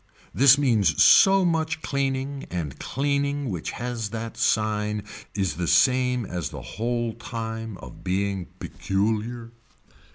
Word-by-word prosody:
This 135 +1 +6
means 110 - +2
so 195 -1 +6
much 160 -2 -1
cleaning 135 0 -2
and 80 -7 -5
cleaning 140 -1 -1
which 85 -4 -4
has 120 -3 -4
that 115 +1 -6
sign 105 -1 0 0.3
is 95 -4 -1
the 85 -1 -2
same 125 +8 +3
as 90 -4 -4
the - - -8
whole 120 0 -2
time 115 -2 -6
of 60 - -12
being 95 0 -1
peculiar. 110 +4 -2
115 Hz, 125 wpm, -25 LUFS, 100-135 Hz, 0.3 s, This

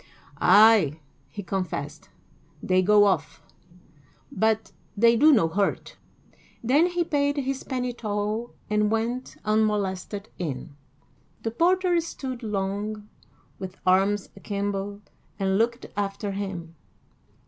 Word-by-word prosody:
"Ay," 205 -9 +6 0.3
he 205 - -7
confessed, 170 -5 -4 0.5
"they 185 0 +3
go 205 +2 +5
off, 155 -7 0 0.9
but 220 -4 0 0.3
they 230 +2 +5
do 300 +7 +6
no 215 - +4
hurt;" 195 +4 -1 0.7
then 285 +9 +4
he 350 -1 0
paid 285 -2 0
his 270 -1 -2
penny 250 -1 -3
toll 215 +1 -3
and 210 0 +1
went 230 +3 -2
unmolested 210 -2 0
in. 145 -4 -5 0.7
The 225 - -1
porter 355 +5 +2
stood 265 -6 -6
long, 210 0 -3 0.5
with 190 0 -7
arms 195 +2 +2
akimbo, 200 0 -4 0.3
and 195 0 +1
looked 235 +2 0
after 200 0 -2
him. 190 -4 -5
210 Hz, 110 wpm, -25 LUFS, 195-235 Hz, 0.9 s, Ay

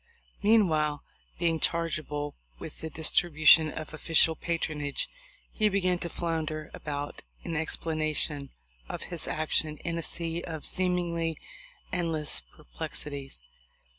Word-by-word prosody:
Meanwhile, 160 -9 +4 0.3
being 165 -2 +2
chargeable 155 -3 0 0.2
with - - -8
the 160 - -3
distribu 155 0 0
tion 155 0 +9
of 155 0 -6
official 160 +1 +4
patronage, 155 -4 -1 0.4
he 215 -1 +3
began 185 -3 +2
to 170 - -2
flounder 155 -2 -2
about 145 -1 -4 0.2
in 170 - -3
explanation 155 -2 -1 0.4
of - - -4
his - - -3
action 155 0 +1
in 170 +1 -2
a - - -1
sea 165 +1 -2
of 160 -3 -5
seem 180 -1 +2
ingly 170 -2 0 0.6
endless 160 - 0
perplexities. 135 - -5
160 Hz, 120 wpm, -29 LUFS, 150-170 Hz, 0.6 s, tion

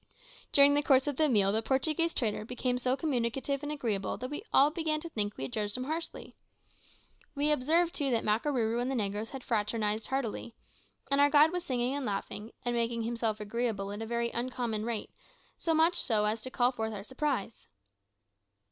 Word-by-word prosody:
During 285 -1 +7
the 290 - +3
course 270 -3 +4
of 290 -3 -2
the 310 -1 +3
meal 200 -5 +3
the 220 +2 +1
Portuguese 310 +7 +2
trader 215 -6 -1
became 250 +2 -2
so 255 +1 +1
communicative 270 -1 -1
and 295 0 -4
agreeable 225 -9 -2
that 255 +2 -6
we 295 - -4
all 285 +2 +5
began 315 -2 -1
to 335 - -7
think 210 -7 -2
we - - -4
had 135 - -5
judged 210 +1 -2
him 255 - -3
harshly. 320 +4 -5 1.0
We 290 +2 +2
observed, 325 +5 +2
too, 280 -2 +1
that 235 -3 +1
Makarooroo 230 +1 +1
and 250 - -1
the 270 - -1
negroes 210 -1 -2
had 270 -2 -8
fraternised 215 -1 0
heartily, 240 -3 -3 0.6
and 280 0 +4
our 285 - +6
guide 300 +2 +6
was 360 -1 -2
singing 250 0 -1
and 285 0 -3
laughing, 210 0 -4
and 240 - 0
making 230 0 0
himself 230 -2 -1
agreeable 210 -2 -2
at 205 +2 -6
a 225 - -4
very 235 0 -1
uncommon 235 -3 -2
rate, 230 -3 -3 0.5
so 325 -1 +1
much 325 +3 +4
so 215 -3 +2
as 215 +1 0
to 255 - -5
call 245 0 +2
forth 220 -3 -3
our 200 -2 -6
surprise. 260 -4 -3
245 Hz, 195 wpm, -30 LUFS, 220-285 Hz, 1.0 s, During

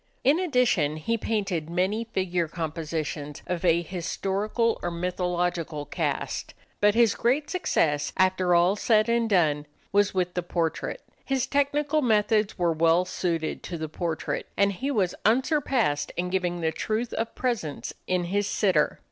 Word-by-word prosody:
In 285 +6 +4
addition 245 - +2
he 230 +9 -1
painted 195 -8 -2
many 190 +6 0
figure 180 -6 -1
compositions 155 -2 -4
of 180 -1 -3
a 170 -1 +3
historical 195 +6 -1
or 175 - -1
mythological 175 -3 -2
cast. - - -3 0.2
But 205 0 +4
his 230 -3 +5
great 270 +6 0
success, 155 - +1
after 185 -1 +3
all 175 +3 +4
said 215 +1 +3
and 235 -1 +2
done, 150 -6 +2 0.2
was 205 0 +3
with 180 -2 -1
the 180 - -1
portrait. 170 -2 -2 0.2
His 265 -2 0
technical 285 +2 +1
methods 215 -3 +2
were 175 -2 +2
well 165 +3 +3
suited 170 -3 -2
to 175 - -5
the 155 -1 -4
portrait, 165 0 -3
and 200 0 +3
he 265 +9 -3
was 200 -10 +1
unsurpassed 250 - +1
in 180 +1 -1
giving 175 -2 -1
the 160 -1 +1
truth 220 +7 -2
of 225 0 -3
presence 175 - -2
in 180 -1 +1
his 200 +3 0
sitter. 185 -7 +1
185 Hz, 150 wpm, -26 LUFS, 170-225 Hz, 0.2 s, his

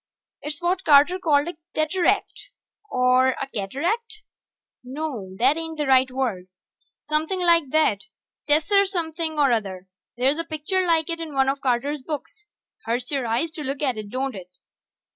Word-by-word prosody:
It's 300 +3 -5
what 365 +2 0
Carter 300 +5 +5
called 300 -4 +2
a 345 -2 -6 0.2
teteract, 345 +9 0 0.4
or 255 -1 +3
a - - -2
cataract... 330 - -3 0.6
no, 250 -8 -5
that 265 +7 +3
ain't 325 -1 -5
the 300 - -1
right 260 -1 +4
word. 245 -9 -2 0.6
Somepin' 320 +4 0
like 335 -5 +4
that 230 -10 +2 0.4
tesser 385 +7 +3
something 330 -3 -3
or 280 -3 +4
other. 195 -5 -2 0.3
There's 270 +5 +2
a - - -1
picture 330 +4 -2
like 325 -2 +2
it 330 - -3
in 315 -3 -6
one 270 0 +3
of 275 0 -2
Carter's 270 +3 0
books. 315 +9 -7 0.4
Hurts 245 +3 -2
your 270 -4 -1
eyes 245 +9 0
to 310 - -7
look 275 +1 -3
at 260 -4 +1
it, 210 -1 -7
don't 260 +3 -2
it? 185 -3 -9
290 Hz, 160 wpm, -24 LUFS, 255-330 Hz, 0.6 s, Carter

